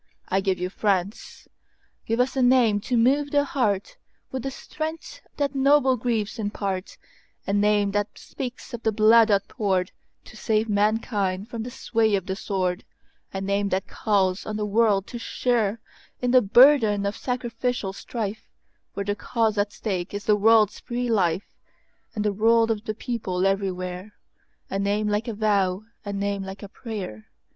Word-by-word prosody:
I 190 - +2
give 190 -1 0
you 180 +1 -3
France! 200 0 -2 0.6
Give 225 +1 0
us 260 +2 +1
a 265 - +1
name 245 -4 +4
to 245 +3 -1
move 275 +5 +3
the 285 0 +2
heartWith 260 - -3
the 270 - -3
strength 315 - -6 0.2
that 285 -1 0
noble 275 -1 +4
griefs 230 -2 -2
impart,A 200 -1 -5
name 205 0 +3
that 205 +1 -2
speaks 255 0 -7
of 235 - -5
the 220 - +1
blood 220 +1 +5
outpouredTo 195 -2 0 0.3
save 220 0 -1
mankind 205 -1 0
from 230 - -4
the 235 - -5
sway 225 -4 +1
of 190 -2 -2
the 190 - -3
sword,—A 190 0 -5
name 200 +1 0
that 190 +1 -1
calls 195 -3 0
on 215 - -3
the 210 - -1
world 210 -2 +2
to 240 - -7
shareIn 230 -3 0 0.5
the 255 0 +6
burden 225 -2 +5
of 200 - -1
sacrificial 245 -4 -2
strifeWhere 210 -2 -7
the 205 0 -1
cause 225 -1 0
at 205 0 +1
stake 190 -3 -4
is 205 - -5
the 210 - +4
world's 215 0 +4
free 245 0 -3
lifeAnd 185 -4 +2 0.8
the 210 - +1
rule 225 +2 +3
of 220 0 -3
the 215 - -3
people 205 -7 -2
everywhere,—A 195 0 -4
name 205 +2 0
like 210 +2 -1
a 230 - -3
vow, 200 -2 +1 0.2
a 205 - -5
name 200 0 -2
like 190 +1 -8
a 200 - -8
prayer. 190 - -7
210 Hz, 150 wpm, -25 LUFS, 195-235 Hz, 0.8 s, the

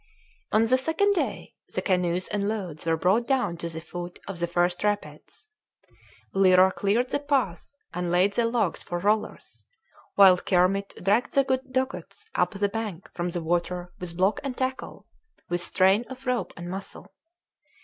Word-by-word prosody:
On 215 - +4
the 255 +3 +3
second 325 +9 +2
day 275 - -3 0.2
the 185 - 0
canoes 180 -1 +1
and 205 -1 -1
loads 185 -8 -4
were 165 0 +2
brought 195 +8 +2
down 260 -10 +1
to 170 0 -4
the 160 -1 -6
foot 175 +1 -7
of 195 -3 -5
the 170 - 0
first 175 +2 0
rapids. 210 - -3 0.9
Lyra 190 -1 +5
cleared 220 +7 0
the - - +1
path 275 - -1 0.2
and 180 0 -2
laid 180 +3 +3
the 235 +2 +2
logs 230 -7 0
for 175 - -4
rollers, 210 +4 -1 0.5
while 190 -2 +7
Kermit 195 +2 +1
dragged 210 +6 +2
the 275 - +4 0.3
dugouts 260 +10 -3
up - - +1
the 200 +1 +1
bank 200 -4 -5
from 175 0 -2
the 175 -1 -4
water 175 +1 -2
with 170 -2 -6
block 190 +3 +2
and 270 -3 -4
tackle, 260 0 -4 0.4
with 175 0 0
strain 190 +4 +3
of 265 0 -10
rope 250 -1 -1
and 175 +1 -7
muscle. 190 +1 -7
195 Hz, 165 wpm, -26 LUFS, 175-230 Hz, 0.9 s, while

